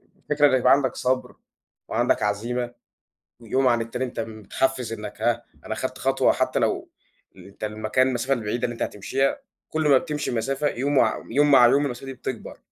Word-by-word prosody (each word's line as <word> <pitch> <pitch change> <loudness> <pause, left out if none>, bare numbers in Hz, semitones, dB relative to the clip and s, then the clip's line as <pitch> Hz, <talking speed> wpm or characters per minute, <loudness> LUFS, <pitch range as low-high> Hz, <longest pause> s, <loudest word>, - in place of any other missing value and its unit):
أ - - -33
الفكرة 150 0 +3
إن 130 -2 +3
يبقى 125 +1 +4
عندك 135 -2 +1
صبر 130 +1 -1 0.5
وعندك - - +1
عزيمة، 120 +4 -2 0.7
ويوم 130 +3 +1
عن 120 -1 +2
التاني 115 +3 -3
أنت 125 -2 -5
متحفِّز، 115 +3 -2
إنك 105 -1 -7
ها، 120 0 +1 0.2
أنا - - -2
خدت - - -4
خطوة، - - +2
حتى - - 0
لو - - 0 0.5
ال - - -13
أنت 100 +2 -9
المكان 110 +4 +1
المسافة 130 +1 -1
البعيدة 120 0 -3
اللي 120 - 0
أنت 115 - -5
هتمشِيها، 135 - -1 0.3
كل 155 -1 0
ما 140 -2 +7
بتمشِي 150 0 -3
مسافة 135 +5 -1
يوم، 140 +2 0
وع - - +2
يوم 145 +1 +3
مع 130 -3 +8
يوم، 140 +4 +4
المسافة 125 0 -6
دي 135 - -6
بتكبَر. 125 -2 -6
125 Hz, 190 wpm, -24 LUFS, 115-135 Hz, 0.7 s, مع